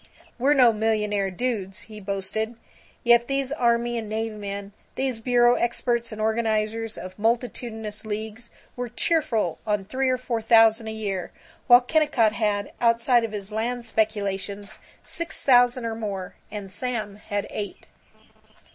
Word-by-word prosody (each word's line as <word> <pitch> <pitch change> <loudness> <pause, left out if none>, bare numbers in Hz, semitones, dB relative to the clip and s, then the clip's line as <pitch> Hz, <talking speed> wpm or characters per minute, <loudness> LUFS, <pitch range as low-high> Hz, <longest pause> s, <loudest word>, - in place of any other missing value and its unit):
"We're 280 +4 +4
no 245 -4 +6
millionaire 210 -2 0
dudes," 195 -2 -3
he 215 -1 -11
boasted. 205 +3 -3 0.5
Yet 235 0 +5
these 275 -1 -1
army 240 -3 +1
and 220 -2 -6
navy 220 +1 -2
men, 200 -1 -6 0.2
these 260 -4 -2
bureau 240 0 +4
experts, 235 -1 0
and 215 - -7
organizers 220 0 0
of 185 +2 -9
multitudinous 225 -2 -2
leagues, 220 +2 -5 0.3
were 245 -1 -4
cheerful 245 - 0
on 210 -2 -1
three 260 +5 0
or 255 - +2
four 240 -2 -3
thousand 225 0 +5
a - - -3
year, 200 -5 -3 0.4
while 245 +1 +9
Kennicott 250 -6 +2
had, 205 -2 -1
outside 235 +1 +4
of 225 - -3
his 205 -1 -6
land 235 +3 -2
speculations, 205 -2 -2 0.2
six 335 -1 -3
thousand 245 -2 +5
or 225 - -2
more, 200 -5 -5 0.2
and 205 -3 -7
Sam 215 -2 -2
had 205 -1 -3
eight. 205 -2 -5
225 Hz, 145 wpm, -25 LUFS, 210-240 Hz, 0.5 s, while